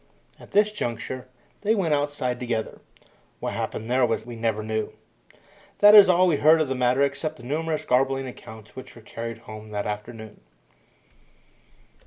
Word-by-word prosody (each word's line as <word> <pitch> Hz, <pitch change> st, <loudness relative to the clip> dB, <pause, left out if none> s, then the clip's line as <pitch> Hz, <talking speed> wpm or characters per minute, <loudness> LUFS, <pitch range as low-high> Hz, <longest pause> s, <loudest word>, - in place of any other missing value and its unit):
At -, -, -14 dB
this 210 Hz, +1 st, +3 dB
juncture 130 Hz, -, -5 dB, 0.3 s
they 215 Hz, +2 st, +2 dB
went 175 Hz, -7 st, +1 dB
outside 145 Hz, -4 st, -1 dB
together. 115 Hz, -3 st, -3 dB, 0.6 s
What -, -, -4 dB
happened 110 Hz, -, -4 dB
there 125 Hz, +2 st, +2 dB
we 120 Hz, 0 st, -1 dB
never 110 Hz, -2 st, -1 dB
knew. 110 Hz, 0 st, -3 dB, 0.8 s
That 205 Hz, 0 st, +7 dB
is 205 Hz, -3 st, +9 dB
all 180 Hz, 0 st, +5 dB
we 170 Hz, -5 st, +2 dB
heard 155 Hz, +3 st, +5 dB
of 155 Hz, -4 st, 0 dB
the -, -, 0 dB
matter 125 Hz, +1 st, +2 dB
except 140 Hz, +3 st, -2 dB
the 120 Hz, -, -14 dB
numerous 155 Hz, +4 st, -2 dB
garbled 135 Hz, +1 st, +1 dB
accounts 110 Hz, -3 st, -11 dB
which 130 Hz, 0 st, -10 dB
were 115 Hz, -, -14 dB
carried 115 Hz, +1 st, -6 dB
home 110 Hz, 0 st, -10 dB
that 105 Hz, -1 st, -3 dB
afternoon. 105 Hz, +1 st, -7 dB
125 Hz, 160 wpm, -24 LUFS, 115-155 Hz, 0.8 s, is